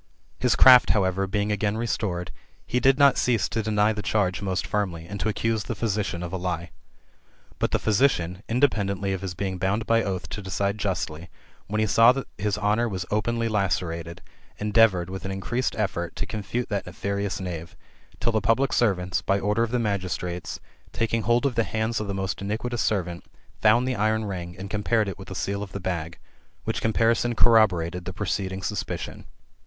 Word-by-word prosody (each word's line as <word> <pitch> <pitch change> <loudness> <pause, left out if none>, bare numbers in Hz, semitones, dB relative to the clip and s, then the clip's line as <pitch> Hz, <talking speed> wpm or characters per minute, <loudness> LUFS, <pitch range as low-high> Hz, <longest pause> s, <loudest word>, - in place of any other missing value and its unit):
His - - +2
craft, 125 -1 +8
however, 95 0 +1
being 105 +2 -1
again 105 +1 0
restored, 100 -6 -2 0.3
he 125 - 0
did 135 +1 +4
not 140 -1 +5
cease 120 -4 +2
to 115 - -1
deny 105 0 +2
the 105 - -4
charge 100 -4 0
most 95 -2 -2
fiimly, 90 -6 -2
and 100 +2 -6
to 110 - 0
accuse 110 -1 -1
the - - -3
physician 100 -6 -2
of 85 - -6
a - - -1
lie. 85 -2 -3 0.9
But - - +1
the - - +1
physician, 100 -6 +1
inde 125 +4 0
peadently 100 -6 +1
of 95 - -4
his 95 -3 -4
being 95 0 -3
bound 100 +4 0
by 115 +1 +3
oath 95 -4 -3
to 105 - -5
decide 100 +2 -2
justly, 85 -4 -3 0.4
when 105 - -2
be 110 - +3
saw 115 +4 +6
that 135 0 -4
his 105 +1 0
honour 105 +3 +1
was 95 -3 -4
openly 115 +2 0
lacerated, 85 -4 -2 0.3
endeavoured, 105 -4 +3
with 95 -1 -6
an 95 - -4
increased 115 +7 -2
effort, 90 -5 -2
to - - -2
confute 110 +4 -3
that 100 -2 -2
nefarious 100 +3 -3
knave; 85 -3 -6 0.4
till 115 - +1
the 110 -1 +1
public 115 +6 +2
servants, 95 -6 +1
by 100 +1 +1
order 105 +3 +1
of 115 - +1
the 125 - 0
ml^2;istrates, 90 -5 -2 0.3
taking 115 0 0
hold 120 +4 +2
of 140 - +1
the 115 -1 +2
hands 110 +3 -1
of 105 - -4
the 100 - -3
most 95 0 -3
iniquitous 110 +3 -2
servant, 90 -3 -1 0.4
found 115 +4 +4
the 130 - 0
iron 110 +1 +1
ring, 90 -3 -5
and 95 +1 -7
compared 105 +1 +1
it 95 -1 -5
with 95 - -9
the 95 - -7
seal 100 +2 -2
of 100 -2 -7
the 100 - -4
bag: 85 -3 -3 0.5
which - - -2
comparison 115 +2 +2
corroborated 90 -7 +3
the 95 - -5
preceding 95 -1 -3
suspicion. 105 - -4
100 Hz, 190 wpm, -25 LUFS, 95-110 Hz, 0.9 s, craft